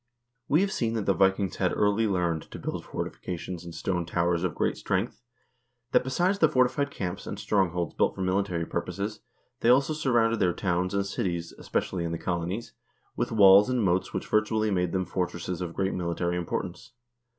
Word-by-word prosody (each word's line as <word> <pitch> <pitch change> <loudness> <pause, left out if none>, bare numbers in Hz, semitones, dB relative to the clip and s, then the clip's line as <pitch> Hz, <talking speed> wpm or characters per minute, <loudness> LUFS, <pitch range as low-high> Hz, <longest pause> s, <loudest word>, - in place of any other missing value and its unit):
We 155 +5 +4
have 200 0 +1
seen 115 -7 -1
that 110 -3 -1
the - - +3
Vikings 95 0 +2
had - - 0
early 105 +2 +2
learned 85 -5 -1
to - - -8
build - - -4
forti - - -4
fications 90 0 -6
and 85 -1 -9
stone 90 -2 -1
towers 85 0 +1
of 90 -3 -1
great - - 0
strength, 100 +6 -2 0.7
that, - - +4
besides 175 +10 +1
the 160 - +5
forti 130 -3 +3
fied 140 +1 0
camps, 95 -7 -5
and 100 - -4
strongholds 90 -5 0
built - - +1
for - - -5
military 95 -2 0
purposes, 105 +6 -3 0.4
they 115 - +2
also 135 +5 +4
surrounded 120 -6 +2
their 90 -3 +3
towns 90 +1 -1
and 100 0 +1
cities, 90 -5 -3
especially 90 -2 -2
in 85 - -2
the - - -2
colonies, 90 +6 -3 0.4
with - - -1
walls 100 0 +7
and 125 -3 +1
moats 95 -1 +1
which - - -3
virtually 110 0 +1
made 90 -2 +1
them 95 -1 0
fortresses 90 0 -3
of 85 -2 -4
great 95 0 0
mili 85 -2 -2
tary 85 0 0
importance. 90 +6 -4
95 Hz, 195 wpm, -27 LUFS, 90-115 Hz, 0.7 s, walls